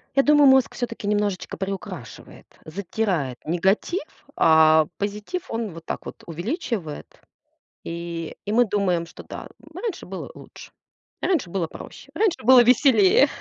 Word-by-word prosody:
Я 275 - +5
думаю, 295 -1 +6
мозг 265 -1 +4
всё-таки 230 -4 -5
немножечко 205 -2 -1
приукрашивает, 190 - -7 0.2
затирает 175 - -2
негатив, 190 - 0 0.3
а 160 -1 +5
позитив 210 - -4
он 225 -4 -3
вот 165 0 -11
так - - -5
вот - - -9
увеличивает. 175 - -5 0.6
И 170 -1 -5
и 205 - -3
мы 240 +3 +4
думаем, 190 -5 0
что 165 - -12
да, - - -8 0.3
раньше 380 +2 -5
было - - -7
лучше. - - -13 0.5
Раньше 320 - 0
было 170 -2 -2
проще. - - -12
Раньше 415 - +1
было 255 0 +8
веселее. 245 -1 +5
205 Hz, 135 wpm, -23 LUFS, 170-250 Hz, 0.6 s, было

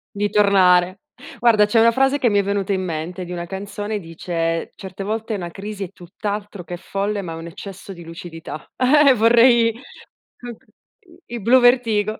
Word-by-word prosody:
Di 205 0 0
tornare. 190 -3 +3 0.4
Guarda, 225 -3 +4
c'è 225 +2 +2
1 230 +1 +5
frase, 270 +3 +1
che 245 -4 +2
mi 205 - +1
è 200 - +3
venuta 200 0 -2
in 190 -1 0
mente 175 +1 -5
di 175 - -9
una 175 -1 -5
canzone, 205 +3 -5
dice: 165 -1 -3
"Certe 190 0 -8
volte 220 +2 -3
una 180 -4 -4
crisi 200 +2 -6
è - - -11
tutt'altro 200 +2 -6
che 175 0 -7
folle, 200 +2 -3
ma 165 - -6
è - - -7
un 165 - -8
eccesso 195 +3 -9
di 170 -1 -12
lucidità." 165 -2 -9
Uhm, 275 +1 +5
vorrei 230 +1 +5
c 235 - -15 0.6
c 245 - -14
uhm, 240 -2 -7 0.7
i 240 - -6
Bluvertigo. 235 -3 +3
200 Hz, 180 wpm, -20 LUFS, 180-225 Hz, 0.7 s, 1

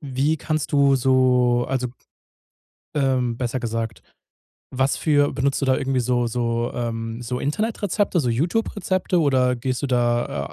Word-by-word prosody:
wie 140 +2 0
kannst 155 -1 -3
du 140 -1 +4
so 125 -1 +3
also, 130 -2 -1 1.1
ähm, 130 -4 +1
besser 125 0 -2
gesagt, 115 -1 -4 0.7
was 130 +1 +1
für 145 -2 +2
benutzt 140 +1 0
du - - +1
da 130 - +3
irgendwie 135 -2 0
so 120 0 +1
so 115 0 -1
ähm, 115 -1 -4
so 125 +2 -3
Internetrezepte 205 +3 -1
so 125 -6 0
Youtube 170 - 0
Rezepte 185 -2 0
oder 130 -4 +2
gehst 130 +2 -3
du 140 - -1
da, 120 - 0
130 Hz, 150 wpm, -22 LUFS, 120-145 Hz, 1.1 s, du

